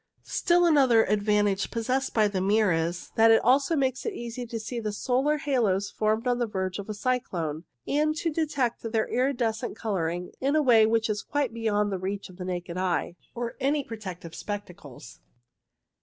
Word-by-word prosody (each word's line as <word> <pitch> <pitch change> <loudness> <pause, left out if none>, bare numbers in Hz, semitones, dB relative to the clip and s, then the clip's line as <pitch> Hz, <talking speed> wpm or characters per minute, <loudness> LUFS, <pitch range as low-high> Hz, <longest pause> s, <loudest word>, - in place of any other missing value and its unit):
Still 350 0 +2
another 265 -8 +5
advantage 205 -1 +1
possessed 255 +4 -1
by 215 -2 +3
the 195 -2 -2
mirror 205 -1 +3
is 165 +2 -2
that 225 0 +6
it 225 - +5 0.3
makes 265 -2 0
it 450 - -3
easy 240 +1 -6
to 230 0 -4
see 235 +2 -5
the 215 -2 -3
solar 265 +7 +1
halos 230 -10 0
formed 220 +2 0
on 245 -1 +1
the 240 - 0
verge 190 -2 -3
of 200 - -7
a - - -2
cyclone, 175 -10 -2 0.2
and 305 +2 +1
to 330 +1 -1
detect 285 -6 -1
their 225 -1 -1
iridescent 240 -2 -1
colouring 180 -5 -2
in 275 +3 +1
a 310 - +4
way 225 -5 +6
which 225 0 +1
is 210 -2 -2
quite 285 -5 -2
beyond 210 -3 0
the 190 - -2
reach 195 +2 -4
of 180 - -14
the 180 - -6
naked 180 -1 -4
eye 180 -1 -1 0.2
or 235 -1 -4
any 280 +2 +1
protective 185 -8 -8
spec 205 0 -5
tacles. 145 -9 -13
220 Hz, 185 wpm, -27 LUFS, 195-255 Hz, 0.3 s, that